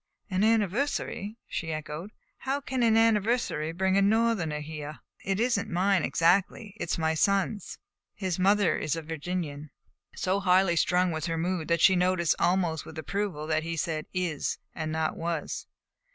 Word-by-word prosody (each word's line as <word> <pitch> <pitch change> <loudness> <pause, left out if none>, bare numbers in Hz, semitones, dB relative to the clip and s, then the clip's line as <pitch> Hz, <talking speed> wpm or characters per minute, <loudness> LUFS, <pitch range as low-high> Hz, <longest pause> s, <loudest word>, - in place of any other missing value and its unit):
"An 185 +2 +1
anniversary?" 220 0 0
she 160 -4 -4
echoed. 155 +4 -5 0.3
"How 270 +1 -1
can 265 -2 -3
an 225 -1 +4
anniversary 225 -7 +2
bring 190 +3 +1
a - - +4
Northerner 205 -7 +2
here?" 150 0 -7 0.3
"It 195 +1 -1
is 235 -2 +2
n't - - -5
mine 185 0 +2
exactly. 195 +4 +1
It 175 - -4
is - - 0
my 160 -1 +1
son's. 200 +5 0 0.4
His 185 -3 -2
mother 200 0 +3
is 155 0 -1
a 165 - -5
Virginian." 155 -2 -4 0.5
So 190 +2 0
highly 185 -2 +3
strung 180 +2 +2
was 160 0 -3
her 165 -1 -1
mood 175 -1 -1
that 170 -1 +1
she 190 - +6
noticed 180 -2 +2
almost 175 -4 +1
with 160 - -11
approval 175 -1 -3
that 155 0 +1
he 165 +1 -4
had 165 - -3
said 155 -3 -2
"is" 180 -5 -2 0.2
and 155 -1 -4
not 160 0 -1
"was." 165 -2 -3
180 Hz, 170 wpm, -28 LUFS, 160-200 Hz, 0.5 s, she